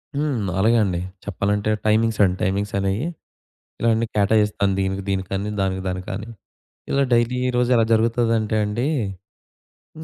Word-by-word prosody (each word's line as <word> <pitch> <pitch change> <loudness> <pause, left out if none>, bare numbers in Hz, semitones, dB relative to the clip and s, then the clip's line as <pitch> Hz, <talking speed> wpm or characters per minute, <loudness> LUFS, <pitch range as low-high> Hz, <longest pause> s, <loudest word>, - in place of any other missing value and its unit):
హ్మ్. 135 -9 -1
అలగే 115 +4 +4
అండి. 90 -4 -1 0.3
చెప్పాలంటే 100 +2 -1 0.2
టైమింగ్స్ 110 +1 +2
అండి 90 -1 +2
టైమింగ్స్ 100 +2 -1
అనేయి 100 +7 -1 0.7
ఇలా 115 - +2
అన్ని 115 +1 +1
కేటాయిస్తాను. 105 -1 +2
దీనికి 95 0 -1
దీనికని. 95 +1 -2
దానికి 95 -1 -1
దానికని. 95 +4 -4 0.6
ఇలా 140 0 +3
డైలీ 120 +1 +2
ఈ - - +1
రోజు 125 0 +2
ఎలా 115 -1 +4
జరుగుతదంటే 115 -1 +1
అండి 110 +5 -2 1.1
హ్మ్, 160 - -8
105 Hz, 140 wpm, -22 LUFS, 95-115 Hz, 1.1 s, అలగే